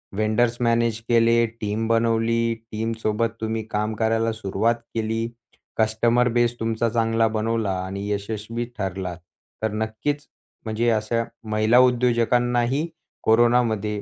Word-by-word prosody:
Vendors 110 +3 +1
manage 115 -1 +2
केले, 115 0 +4 0.2
team 110 +2 -1
बनवली. 115 0 +2 0.2
टीमसोबत 110 0 -1
तुम्ही 110 0 -2
काम 105 +1 -1
करायला 115 +1 +1
सुरुवात 110 +2 0 0.2
केली. 115 +1 -1 0.5
कस्टमर 115 +2 +2
बेस 120 0 +2
तुमचा 115 +1 0
चांगला 115 0 +2
बनवला 110 -2 0
आणि 100 +2 -5
यशस्वी 110 +3 -3
ठरला. 95 -3 -3 0.5
तर 110 - +1
नक्कीच 110 +7 -3 0.4
म्हणजे 115 +2 0
अशा 115 +1 0 0.3
महिला 110 +3 +3
उद्योजकांनाही 120 +2 +2 0.4
कोरोनामध्ये 110 -2 +2
115 Hz, 110 wpm, -23 LUFS, 110-115 Hz, 0.5 s, केले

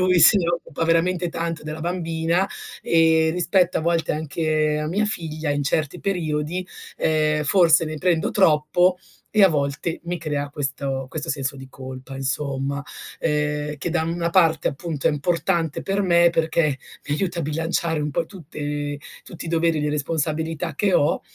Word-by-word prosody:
lui 185 -1 +3
se 210 - +10
ne 170 - -1
occupa 170 -2 -2
veramente 170 +2 +1
tanto 165 -1 -4
della 155 +1 -6
bambina, 170 +1 0 0.4
ehm, 160 -1 +3
rispetto 180 +1 +2
a - - -2
volte 165 0 0
anche 155 0 0
a 150 - -2
mia 195 +7 0
figlia, 160 -6 0
in 145 0 0
certi 155 +4 -1
periodi, 175 -1 -2 0.3
ehm, 155 -1 +1
forse 165 0 +5
ne 155 0 -5
prendo 175 -1 +1
troppo 175 0 +3 0.4
e 215 -2 +6
a - - +7
volte 145 +1 -2
mi 175 +1 -3
crea 145 -3 -3
questo 135 -2 -3
questo 150 +1 -2
senso 140 -1 -1
di 135 0 -10
colpa, 130 0 -9
insomma, 140 +1 -2 0.4
ehm, 150 -1 -1
che 160 - -3
da 160 -1 0
una 170 +1 -1
parte, 165 -3 +3
appunto, 150 0 -4
è 165 - +5
importante 165 +1 -1
per 195 +1 -1
me 170 -2 +4
perché 160 -3 +1 0.3
mi 145 - +1
aiuta 175 +1 -2
a - - -1
bilanciare 160 +1 -1
un 150 0 -2
po' 165 - -1
tutte 145 -5 -5 0.2
tutti 170 - -9
i - - -6
doveri 165 -1 +1
di 150 - -1
responsabilità 160 +2 -1
che 195 +4 +1
ho 145 - +2
160 Hz, 170 wpm, -22 LUFS, 150-170 Hz, 0.4 s, se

